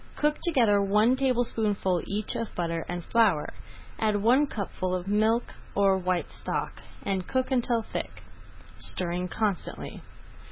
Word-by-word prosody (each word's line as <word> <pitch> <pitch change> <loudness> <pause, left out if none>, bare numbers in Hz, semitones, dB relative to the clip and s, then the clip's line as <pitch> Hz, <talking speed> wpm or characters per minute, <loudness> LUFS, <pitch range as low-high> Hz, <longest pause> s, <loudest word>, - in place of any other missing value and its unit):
Cook 300 0 +1
together 235 - +3
one 210 +5 +4
tablespoonful 225 -8 +1
each 210 +1 -2
of 230 -1 -4
butter 165 -2 -1
and 175 -1 -4
flour, 210 -10 +2 0.5
add 215 -1 +2
one 245 +8 +4
cupful 185 -5 -3
of 180 +1 -4
milk, 220 +3 +2 0.2
or 195 -1 +4
white 180 -1 -1
stock, - - -4 0.2
and 190 -2 -2
cook 260 0 0
until 240 -2 +2
thick, - - -6 0.6
stirring 180 0 -1
constantly. 200 -1 -3
210 Hz, 130 wpm, -28 LUFS, 185-235 Hz, 0.6 s, one